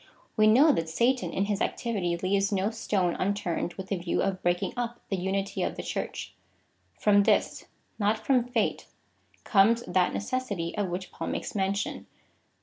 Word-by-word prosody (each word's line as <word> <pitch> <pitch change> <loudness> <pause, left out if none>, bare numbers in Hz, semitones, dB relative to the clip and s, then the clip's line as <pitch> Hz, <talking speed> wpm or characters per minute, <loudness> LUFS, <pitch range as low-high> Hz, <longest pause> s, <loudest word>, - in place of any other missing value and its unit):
We 215 0 +5
know 270 +9 +7
that 165 - -1
Satan, 240 +9 +1
in 195 - 0
his 205 0 -2
activity, 190 -8 -1
leaves 195 +3 +1
no 200 +2 +1
stone 195 -6 0
unturned 185 -3 -1
with 190 0 -7
the 195 - 0
view 175 0 -1
of 195 -1 -1
breaking 175 0 0
up 240 -1 -3
the 195 - 0
unity 195 +2 -2
of - - -1
the - - -6
Church. - - -4 0.6
From 205 -1 +4
this 200 - +1 0.2
— - - -41
not 210 +1 +2
from 255 -3 +4
fate 245 -3 -1 0.3
— - - -35
comes 225 +4 +5
that 180 0 +2
necessity 205 -7 -3
of 205 -3 -1
which 180 +2 -5
Paul - - -5
makes - - -3
mention. 195 0 -2
200 Hz, 175 wpm, -28 LUFS, 185-220 Hz, 0.6 s, know